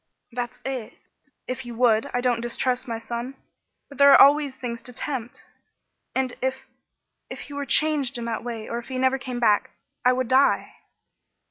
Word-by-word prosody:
"That's 245 +1 -5
it. 260 -4 -5 0.5
If 255 - -3
he 240 - -7
would, 230 -2 +2
I 245 - -1
don't 245 -2 +1
distrust 250 +2 -1
my 230 -1 -3
son, 235 +3 -5 0.5
but 280 -1 -14
there 280 0 +8
are - - +8
always 285 -1 +6
things 235 -3 -5
to 250 - -11
tempt, 245 -1 -5 0.7
and 260 -1 0
if 260 +1 -2 0.6
if - - -7
he 290 - -9
were 285 -1 -4
changed 290 -4 +2
in 235 - -5
that 230 -1 -3
way, 230 -2 -5
or 235 - -3
if 240 - -11
he 260 -1 -4
never 260 +1 +2
came 250 -1 -5
back, 210 -4 +3 0.3
I 250 - +5
would 255 -1 -1
die." 265 +3 +3
250 Hz, 180 wpm, -24 LUFS, 235-265 Hz, 0.7 s, there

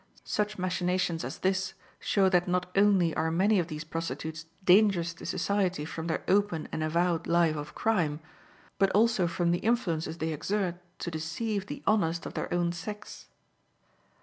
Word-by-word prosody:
Such 210 0 -1
machinations 180 -2 0
as - - -5
this 190 0 0 0.2
show 195 -2 +2
that 180 -1 +2
not 180 0 0
only 195 -5 +4
are 160 +1 +1
many 190 +5 +3
of 170 - -1
these 155 +1 -5
prostitutes 160 0 -5 0.2
dangerous 185 -3 +4
to - - -9
society 185 -6 0
from 160 +1 -5
their 165 - -1
open 195 -5 +2
and - - -3
avowed 170 +1 +1
life 170 -2 +3
of 150 0 -6
crime, 170 -10 +1 0.6
but 195 0 +4
also 215 -3 +3
from 170 0 0
the 175 - +1
influences 170 -9 0
they 160 -1 -2
exert 180 +2 -2 0.2
to 170 - -3
deceive 190 +6 -3
the - - -7
honest 170 -6 +1
of - - -6
their - - -4
own 175 -1 +1
sex. 205 +5 -8
175 Hz, 165 wpm, -29 LUFS, 165-195 Hz, 0.6 s, only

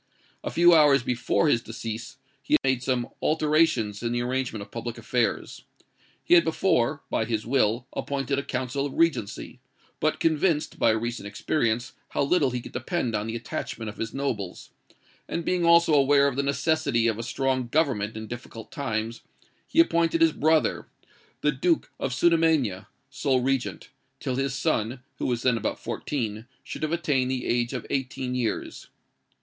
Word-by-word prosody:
A - - -2
few 175 +1 +5
hours 145 -4 +6
before 125 +5 +1
his 120 -6 +3
decease, 115 0 -6 0.2
he - - +3
made 130 -2 +1
some 125 -2 0
alterations 150 -9 +2
in 115 0 -1
the 120 0 0
arrangement 125 -4 -2
of - - -15
public 120 0 -5
affairs. 115 +1 -2 0.6
He - - +3
had 170 -1 +8
before, 160 -7 +1
by 110 - +1
his 110 -2 -2
will, 120 -1 +1
appointed 140 0 -2
a - - -3
council 130 +2 -2
of 135 - -9
regency, 165 -11 0 0.4
but - - 0
convinced, 160 0 +1
by - - +4
recent 110 -1 -1
experience, 115 +2 -1 0.2
how - - 0
little 145 -1 +3
he 125 -1 -3
could - - -10
depend 130 -1 -2
on 105 0 -1
the 115 - -3
attachment 115 -1 -5
of 105 - -10
his 115 - -3
nobles, 115 -10 -4 0.6
and 170 - -3
being 180 -1 +1
also 170 -1 +6
aware 140 0 +5
of 140 - -1
the 140 - +1
necessity 140 -3 +1
of 115 -1 +1
a - - -1
strong 130 +1 -1
government 120 -7 0
in 110 - -5
difficult 115 -1 -9
times, 115 -4 -3 0.5
he - - 0
appointed 165 - +3
his 165 -1 +5
brother, 155 +1 +1 0.5
the 150 - +3
Duke 160 +5 0
of 135 - -2
Sudermania, 150 - +2 0.2
sole 135 -1 +1
regent, 135 0 -2 0.3
till 130 -2 -2
his 135 0 -1
son, 120 -1 -1 0.2
who - - -1
was 120 -2 -1
then 125 -3 +3
about 110 - -2
fourteen, 110 -5 -4 0.2
should - - -7
have 155 0 -1
attained 145 -6 +1
the 130 -1 -2
age 120 0 0
of 125 -4 -5
eighteen 130 -1 -2
years. 125 -3 -3
130 Hz, 170 wpm, -26 LUFS, 115-150 Hz, 0.6 s, had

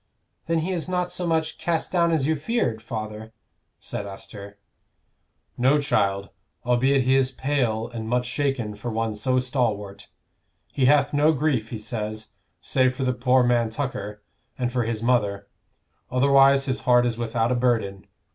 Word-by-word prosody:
"Then 165 0 +1
he 190 - -2
is 180 -1 -3
not 180 -1 -1
so 180 0 -3
much 160 -1 -1
cast 165 -2 -1
down 170 -2 +2
as 155 -5 +1
you 160 +2 +2
feared, 145 - -1
father?" 110 -1 -6 0.5
said 100 - -6
Esther. 100 +1 -10 1.0
"No, 135 +4 +4
child; 100 -8 0 0.4
albeit 130 +2 +3
he 130 +1 +2
is 135 -1 +3
pale 130 -5 -1
and 110 -2 -6
much 125 +1 +1
shaken 130 -4 -1
for 105 +4 -6
one 115 -1 -1
so 130 +5 0
stalwart. 120 -6 -2 0.7
He 135 - +1
hath 145 +3 +4
no 150 +2 +4
grief, 135 -6 0
he 115 - -5
says, 110 0 -5 0.3
save 130 -1 +1
for 135 - -3
the 125 -1 +1
poor 125 +1 +3
man 120 -2 +2
Tucker, 105 -5 -5 0.3
and 125 -1 -2
for 125 -2 0
his 115 -1 -3
mother; 105 -5 +1 0.6
otherwise 135 +1 +4
his 130 -1 -1
heart 125 -1 +4
is 120 -1 -2
without 115 0 0
a - - +3
burden. 115 -6 0
125 Hz, 165 wpm, -24 LUFS, 110-140 Hz, 1.0 s, No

